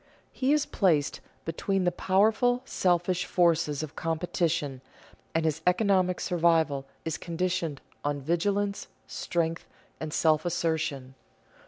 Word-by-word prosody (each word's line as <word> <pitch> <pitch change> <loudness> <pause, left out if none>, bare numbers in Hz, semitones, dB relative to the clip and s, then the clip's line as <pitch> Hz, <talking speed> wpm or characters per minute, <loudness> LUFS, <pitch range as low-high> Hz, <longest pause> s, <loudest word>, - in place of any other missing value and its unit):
He 260 +1 0
is 300 -1 +3
placed 155 -7 +1 0.3
between 190 +4 -1
the 175 - +2
powerful, 220 +7 +2
selfish 180 -3 +1
forces 165 -4 +2
of 155 - -7
competition, 165 -4 -1 0.5
and 165 0 +2
his 160 0 0
economic 185 -1 +3
survival 160 -5 +2 0.2
is 160 - -2
conditioned 170 -3 -2 0.2
on 145 0 -1
vigilance, 200 +7 0 0.2
strength, 165 -1 -2 0.3
and 155 -1 -4
self 155 -1 +3
assertion. 160 -6 -1
170 Hz, 115 wpm, -28 LUFS, 155-185 Hz, 0.5 s, is